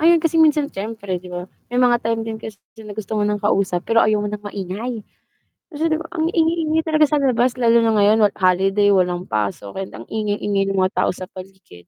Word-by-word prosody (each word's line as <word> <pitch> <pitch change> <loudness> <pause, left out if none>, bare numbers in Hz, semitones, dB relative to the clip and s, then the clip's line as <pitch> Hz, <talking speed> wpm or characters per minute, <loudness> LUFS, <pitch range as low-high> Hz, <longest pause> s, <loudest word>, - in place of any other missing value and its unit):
Ayun, 335 +2 +5
kasi 330 0 +1
minsan 300 -2 +3
siyempre, 200 -2 -5
'di 180 - -12
ba, 180 0 -5 0.2
may 245 - -2
mga 240 -1 +4
time 230 0 -1
din 225 -1 -5
kasi 220 -2 -8 0.3
na 205 - -8
gusto 215 0 -3
mo - - +1
ng 210 0 -2
kausap, 195 -3 +1
pero 230 0 +3
ayaw 215 -1 +1
mo - - -1
ng 210 0 -6
maingay. 205 +4 -5 0.7
Kasi 315 +2 -1
'di 315 - +1
ba, 325 - -8
ang 320 -1 0
ingay-ingay 320 -1 +1
talaga 310 -1 +3
sa 300 - +2
labas 255 -3 +1
lalo 235 -1 +4
na 225 -1 +2
ngayon, 210 +2 +4
wal 205 -1 +3
holiday 195 +2 +3
walang 180 -2 +1
pasok 105 - -3
and 190 - -7
ang 115 - -9
ingay-ingay 205 -2 -1
ng 195 - -2
mga 185 +1 +1
tao - - +2
sa 185 - -7
paligid, 185 - -13
210 Hz, 220 wpm, -20 LUFS, 195-250 Hz, 0.7 s, Ayun